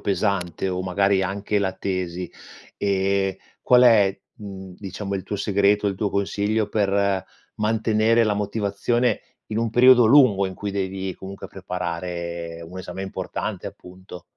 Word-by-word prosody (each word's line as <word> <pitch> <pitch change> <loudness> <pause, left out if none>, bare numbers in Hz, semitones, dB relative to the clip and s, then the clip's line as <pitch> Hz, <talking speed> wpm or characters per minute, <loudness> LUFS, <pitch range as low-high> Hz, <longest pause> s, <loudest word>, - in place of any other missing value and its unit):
pesante, 95 -2 -1
o 90 0 -2
magari 95 +1 +2
anche 100 +2 -1
la 95 -1 0
tesi, 90 -2 -3 0.5
ehm, 95 -1 +1 0.3
qual 125 0 +5
è, 105 -5 +5 0.2
mhmm, 95 -3 -9
diciamo 100 0 -5
il 95 - -3
tuo 105 - -4
segreto, 100 +1 +2
il 100 - 0
tuo 100 +1 -2
consiglio, 105 +2 0
per 100 -2 +1 0.3
mantenere 110 +1 +2
la 105 - +1
motivazione 105 +3 0 0.3
in 110 - -3
un 115 0 0
periodo 125 +1 +7
lungo, 120 -7 +5
in 95 - -6
cui 100 +1 -5
devi 95 -1 -3
comunque 95 +1 -9
preparare 85 -2 -5
un 90 - -10
esame 95 +1 -6
importante, 95 - -4
appunto? 90 -1 -12
100 Hz, 140 wpm, -23 LUFS, 95-105 Hz, 0.5 s, periodo